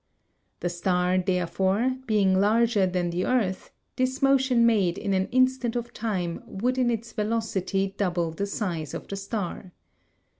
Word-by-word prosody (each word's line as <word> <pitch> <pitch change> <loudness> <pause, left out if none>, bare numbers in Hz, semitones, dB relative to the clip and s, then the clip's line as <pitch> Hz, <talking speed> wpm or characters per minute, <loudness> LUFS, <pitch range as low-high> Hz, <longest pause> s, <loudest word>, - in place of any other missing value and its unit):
The 175 - 0
star, 180 +1 +1
therefore, 190 +6 0
being 195 -4 +3
larger 215 -1 +3
than 180 -1 -1
the 175 +2 -1
earth, 210 -7 0 0.3
this 255 +1 0
motion 265 -3 +4
made 200 -7 +2
in 200 -2 -2
an 190 0 +1
instant 255 -2 +1
of 240 0 -4
time 185 -7 -3
would 250 +6 -1
in 250 -1 +3
its 230 0 -3
velocity 205 -3 -1
double 175 -4 0
the 200 +5 -3
size 175 -7 -3
of - - -7
the 200 - -5
star. 195 -2 -5
200 Hz, 150 wpm, -26 LUFS, 185-235 Hz, 0.3 s, motion